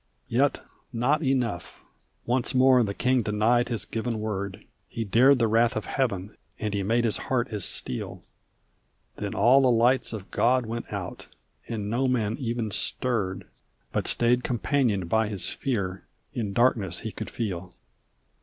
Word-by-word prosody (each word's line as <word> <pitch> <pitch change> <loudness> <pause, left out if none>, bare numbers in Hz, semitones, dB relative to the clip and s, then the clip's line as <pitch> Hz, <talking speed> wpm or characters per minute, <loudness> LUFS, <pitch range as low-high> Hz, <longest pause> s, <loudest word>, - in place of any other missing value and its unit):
Yet - - +2 0.3
not 135 +7 +1
enough. 125 - -1 0.4
Once 125 +1 0
more 130 0 +6
the 100 -3 -1
king 125 0 +2
denied 110 +3 +2
his 115 -3 -3
given 115 0 -3
word; 100 -3 -4 0.2
He 115 - -3
dared 125 +7 +5
the 115 -2 +2
wrath 115 +2 +3
of 110 - -3
Heaven, 105 -7 -2 0.2
and 105 -2 -3
he 100 - 0
made 115 +5 +1
his 115 -3 +1
heart 130 -1 +1
as 105 -4 -2
steel; 60 - -4 0.9
Then - - -4
all 125 +6 +5
the 130 - +4
lights 120 +2 +3
of 105 -4 -7
God 125 +1 +2
went 115 +1 -5
out, - - -6 0.4
and 110 -3 -4
no 120 +5 +1
man 115 -4 0
even 115 -4 -2
stirred 100 -4 -1 0.5
But - - -1
stayed 120 +1 +3
companioned 120 -6 0
by 110 +4 +2
his 100 -4 -1
fear, 95 -8 -3 0.3
in 110 -5 -2
darkness 100 -5 +2
he 110 - -4
could - - -6
feel. 90 -6 -4
115 Hz, 155 wpm, -26 LUFS, 105-125 Hz, 0.9 s, more